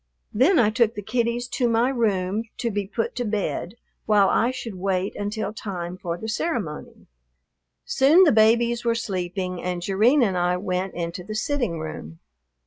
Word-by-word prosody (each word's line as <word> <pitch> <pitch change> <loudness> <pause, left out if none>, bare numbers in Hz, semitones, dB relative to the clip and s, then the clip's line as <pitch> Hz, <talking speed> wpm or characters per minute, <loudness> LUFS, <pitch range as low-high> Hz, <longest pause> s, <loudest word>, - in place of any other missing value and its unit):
Then 290 - +4
I 220 -5 +4
took 230 0 +2
the 205 - -5
kiddies 240 +2 -1
to 245 -2 0
my 230 +2 +2
room 210 -4 0
to 235 - -2
be 205 -1 -2
put 225 +3 -2
to 245 - 0
bed 205 -3 -2 0.3
while 205 -2 +4
I 235 - +2
should 250 -4 -5
wait 190 +1 -2
until 205 0 -3
time 180 -5 -5
for 175 -2 -4
the 220 - -7
ceremony. 220 - -4 0.8
Soon 300 +8 +5
the 325 - +5
babies 235 +2 +3
were 235 -1 +1
sleeping, 185 -4 -3
and 180 -1 -2
Jerrine 225 +9 +3
and 195 -5 +1
I 180 0 +1
went 185 0 -3
into 170 +1 -4
the 215 +4 -6
sitting 235 - -1
room. 155 - -7
210 Hz, 170 wpm, -24 LUFS, 185-235 Hz, 0.8 s, Soon